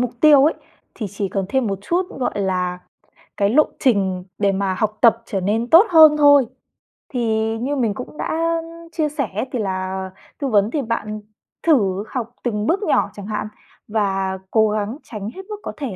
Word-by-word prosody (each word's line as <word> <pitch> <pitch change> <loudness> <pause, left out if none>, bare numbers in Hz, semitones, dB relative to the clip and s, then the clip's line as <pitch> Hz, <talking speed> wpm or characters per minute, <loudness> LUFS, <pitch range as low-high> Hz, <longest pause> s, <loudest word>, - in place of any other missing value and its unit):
mục 250 -1 0
tiêu 295 -3 +7
ấy 310 - +3 0.4
thì 215 - -4
chỉ 200 -1 -3
cần 195 0 -2
thêm 260 +2 0
một 195 -2 -2
chút, 350 - 0
gọi 245 -5 -2
là, 180 -2 -1 0.6
cái 200 0 +2
lộ 295 +8 +5 0.2
trình 190 -7 +1
để 200 -1 +2
mà 195 -1 -1
học 215 +2 -1
tập 230 -1 +5
trở 195 -5 -3
nên 220 +5 -1
tốt 340 +6 +8
hơn 315 -3 +7
thôi. 285 -2 +6 0.6
Thì 225 -3 -1
như 265 +5 -2
mình 235 -6 0
cũng 250 +7 -9
đã, 330 +1 -1
ưm, 335 0 -12
chia 310 -2 -1
sẻ 280 -6 -3 0.2
thì 250 - -2
là 190 -1 -3 0.3
tư 280 - -1
vấn 210 -2 +2
thì 295 - -1
bạn 215 -3 -3 0.4
thử 205 - +2
học 240 -2 -4
từng 210 -3 -1
bước 390 +5 +1
nhỏ - - +2
chẳng 205 - -9
hạn, 215 0 -3 0.4
và 195 -3 -1
cố 220 -1 +4
gắng 215 +4 -2
tránh 210 -2 -6
hết 380 - -7
mức 425 - -4
có - - -4
thể 265 -10 -4
225 Hz, 195 wpm, -20 LUFS, 200-285 Hz, 0.6 s, tốt